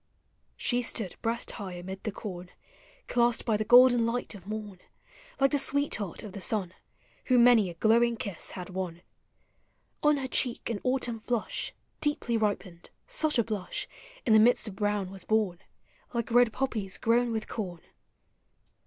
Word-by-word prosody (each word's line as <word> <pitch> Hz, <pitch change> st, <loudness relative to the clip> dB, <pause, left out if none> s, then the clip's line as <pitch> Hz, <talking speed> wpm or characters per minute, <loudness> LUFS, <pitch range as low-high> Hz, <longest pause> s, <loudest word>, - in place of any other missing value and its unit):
Smo 245 Hz, 0 st, +1 dB
stood 215 Hz, -5 st, -3 dB
breast 230 Hz, +1 st, -2 dB
high 195 Hz, -4 st, -6 dB
amid 190 Hz, +2 st, -7 dB
the 215 Hz, -, -2 dB
corn, 185 Hz, -3 st, -7 dB, 0.6 s
Clasped 240 Hz, -1 st, +2 dB
by 225 Hz, -, +2 dB
the 215 Hz, -, 0 dB
golden 245 Hz, +1 st, +7 dB
light 230 Hz, +1 st, -2 dB
of 195 Hz, -2 st, -12 dB
morn, 210 Hz, -3 st, -6 dB, 0.6 s
lake 275 Hz, 0 st, +4 dB
the 290 Hz, -, +2 dB
sweetheart 265 Hz, -, -1 dB
of 210 Hz, -, -7 dB
the 200 Hz, -, -7 dB
sun, 185 Hz, -3 st, -1 dB, 0.5 s
Who 255 Hz, -, +3 dB
many 235 Hz, -5 st, +6 dB
a 170 Hz, -, -8 dB
glowing 230 Hz, +5 st, +3 dB
kiss 200 Hz, -6 st, -4 dB
had 180 Hz, +1 st, -7 dB
won. 180 Hz, -2 st, -5 dB, 1.0 s
On 300 Hz, 0 st, +4 dB
her 265 Hz, -1 st, -3 dB
cheek 245 Hz, -2 st, 0 dB
an 215 Hz, -, -3 dB
autumn 250 Hz, -3 st, 0 dB
Hush 240 Hz, -3 st, -1 dB, 0.3 s
Deeply 295 Hz, -5 st, 0 dB
ripened; 205 Hz, -5 st, -2 dB
— -, -, -44 dB
such 310 Hz, -3 st, +2 dB
a 235 Hz, -, +4 dB
blush 205 Hz, -4 st, -4 dB, 0.4 s
In 225 Hz, -, +4 dB
the 220 Hz, -, +8 dB
midst 235 Hz, +1 st, +4 dB
of 200 Hz, -, -7 dB
brown 205 Hz, -2 st, -1 dB
was 195 Hz, -2 st, -10 dB
born. 210 Hz, -6 st, +1 dB, 0.6 s
Like 235 Hz, 0 st, -2 dB
red 245 Hz, -1 st, +5 dB
poppies 215 Hz, -7 st, -2 dB
grown 235 Hz, +1 st, +2 dB
with 220 Hz, -1 st, -3 dB
corn. 180 Hz, -7 st, -5 dB
220 Hz, 165 wpm, -29 LUFS, 195-240 Hz, 1.0 s, the